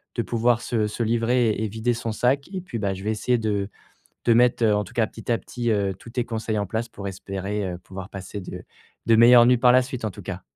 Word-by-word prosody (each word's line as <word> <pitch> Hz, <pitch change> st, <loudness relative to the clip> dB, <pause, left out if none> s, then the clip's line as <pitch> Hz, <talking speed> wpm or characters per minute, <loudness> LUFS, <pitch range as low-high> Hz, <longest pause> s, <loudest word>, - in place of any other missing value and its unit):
de 120 Hz, -, 0 dB
pouvoir 120 Hz, 0 st, +1 dB
se 115 Hz, -3 st, -1 dB
se 105 Hz, -, -6 dB
livrer 115 Hz, +1 st, +2 dB
et 110 Hz, +1 st, -2 dB
vider 110 Hz, +3 st, -1 dB
son 115 Hz, -1 st, -4 dB
sac 130 Hz, +7 st, 0 dB
et 190 Hz, -, -2 dB
puis, 175 Hz, -10 st, -6 dB
bah, 100 Hz, -3 st, -1 dB
je 95 Hz, 0 st, -8 dB
vais 110 Hz, -, +1 dB
essayer 120 Hz, +3 st, +1 dB
de 105 Hz, -3 st, -1 dB, 0.6 s
de 120 Hz, -, +4 dB
mettre, 120 Hz, 0 st, +3 dB
heu, 105 Hz, -2 st, +4 dB
en 105 Hz, 0 st, 0 dB
tout -, -, -14 dB
cas 115 Hz, -2 st, +2 dB
petit 115 Hz, +1 st, -8 dB
à -, -, +3 dB
petit, 120 Hz, 0 st, -3 dB
heu, 100 Hz, -2 st, 0 dB
tous -, -, -14 dB
tes 125 Hz, 0 st, -1 dB
conseils 110 Hz, -2 st, -3 dB
en 100 Hz, -, 0 dB
place 110 Hz, +5 st, -3 dB
pour 100 Hz, -3 st, -8 dB
espérer, 100 Hz, +2 st, -4 dB
heu, -, -, -8 dB
pouvoir 95 Hz, +1 st, -9 dB
passer 100 Hz, 0 st, -7 dB
de 90 Hz, -, -8 dB, 0.4 s
de 115 Hz, -, +5 dB
meilleures 120 Hz, +1 st, +8 dB
nuits 125 Hz, 0 st, +4 dB
par 125 Hz, 0 st, +5 dB
la 130 Hz, +1 st, +5 dB
suite 130 Hz, -2 st, -6 dB
en 110 Hz, -, -2 dB
tout -, -, -11 dB
cas. -, -, -6 dB
115 Hz, 260 wpm, -24 LUFS, 105-120 Hz, 0.6 s, meilleures